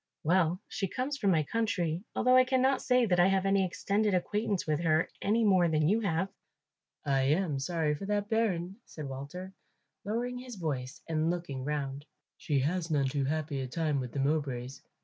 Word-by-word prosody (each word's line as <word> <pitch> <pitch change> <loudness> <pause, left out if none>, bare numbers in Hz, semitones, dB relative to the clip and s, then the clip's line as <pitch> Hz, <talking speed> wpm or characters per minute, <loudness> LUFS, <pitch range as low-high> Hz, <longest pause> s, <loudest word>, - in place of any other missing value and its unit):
"Well, 175 +1 +2
she 195 - -2
comes 255 +9 -2
from 200 - +2
my 160 -4 +3
country, 185 -5 -1
although 255 0 +4
I 255 - +8
cannot 260 +1 +2
say 250 -1 +3
that 180 -4 +2
I 175 - +6
have 195 0 +2
any 195 0 +3
extended 200 +2 0
acquaintance 205 +2 -1
with 155 -1 0
her 160 -1 +2
any 220 +3 +2
more 185 -4 +4
than 155 -2 +2
you 210 +6 +3
have." 190 -2 0 0.8
"I 135 -2 +2
am 150 0 +1
sorry 155 +1 0
for 170 +7 -6
that 205 0 0
bairn," 195 -5 0
said 150 -3 -8
Walter, 145 +8 -7 0.5
lowering 245 +4 -2
his 250 -2 -8
voice 140 -8 -4
and 160 0 0
looking 170 -7 -3
round; 140 -1 -3 0.3
"she 145 - -1
has 165 +4 -1
none 140 -4 +1
too 140 0 -1
happy 150 -1 -2
a 130 - -3
time 150 +1 -1
with 125 -2 -4
the 140 - -4
Mowbrays. 135 -3 -1
170 Hz, 190 wpm, -30 LUFS, 150-200 Hz, 0.8 s, I